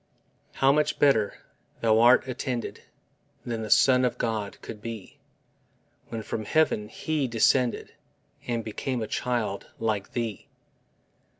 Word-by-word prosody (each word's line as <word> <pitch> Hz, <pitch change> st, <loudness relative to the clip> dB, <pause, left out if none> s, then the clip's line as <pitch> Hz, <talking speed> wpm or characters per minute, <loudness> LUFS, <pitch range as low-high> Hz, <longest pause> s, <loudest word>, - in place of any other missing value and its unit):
How 135 Hz, 0 st, +4 dB
much 150 Hz, +1 st, +1 dB
better 115 Hz, -8 st, +3 dB, 0.5 s
thou'rt 115 Hz, +3 st, +5 dB
attended 125 Hz, -1 st, -4 dB, 0.6 s
Than 115 Hz, -2 st, -3 dB
the 110 Hz, -, -5 dB
Son 130 Hz, +2 st, +5 dB
of 125 Hz, -, 0 dB
God 110 Hz, -3 st, -2 dB
could 105 Hz, -, -8 dB
be, 115 Hz, -3 st, -8 dB, 0.9 s
When 115 Hz, -2 st, -5 dB
from 110 Hz, +1 st, -4 dB
heaven 105 Hz, -7 st, +1 dB
He 155 Hz, -4 st, -2 dB
descended 120 Hz, +1 st, +2 dB, 0.5 s
And 115 Hz, -1 st, -1 dB
became 120 Hz, +3 st, -3 dB
a -, -, -2 dB
child 115 Hz, -6 st, -2 dB
like 110 Hz, -3 st, -2 dB
thee! 115 Hz, -4 st, -3 dB
115 Hz, 120 wpm, -27 LUFS, 110-130 Hz, 0.9 s, thou'rt